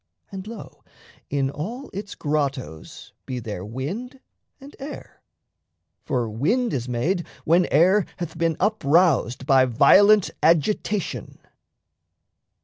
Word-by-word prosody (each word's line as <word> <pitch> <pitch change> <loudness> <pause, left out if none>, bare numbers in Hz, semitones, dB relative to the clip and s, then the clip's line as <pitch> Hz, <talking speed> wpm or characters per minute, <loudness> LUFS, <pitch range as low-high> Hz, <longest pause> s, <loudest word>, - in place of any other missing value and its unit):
And, 195 0 -7
lo, 225 -1 -10 0.5
In 135 -1 0
all 230 - -6
its 200 +1 -6
grottos 140 - -4
be 130 - -4
there 105 -6 -6
wind 175 - -6 0.4
and 280 +1 -13
air 280 +2 -9 0.8
For 120 -2 -1
wind 190 - 0
is 125 -2 -3
made 165 +10 -1 0.2
when 175 +3 +3
air 185 +4 +3
hath 175 -3 -6
been 165 -1 0
uproused 165 - +2
By 135 -1 +5
violent 200 - +5
agitation. 175 +4 0
165 Hz, 110 wpm, -23 LUFS, 130-205 Hz, 0.8 s, By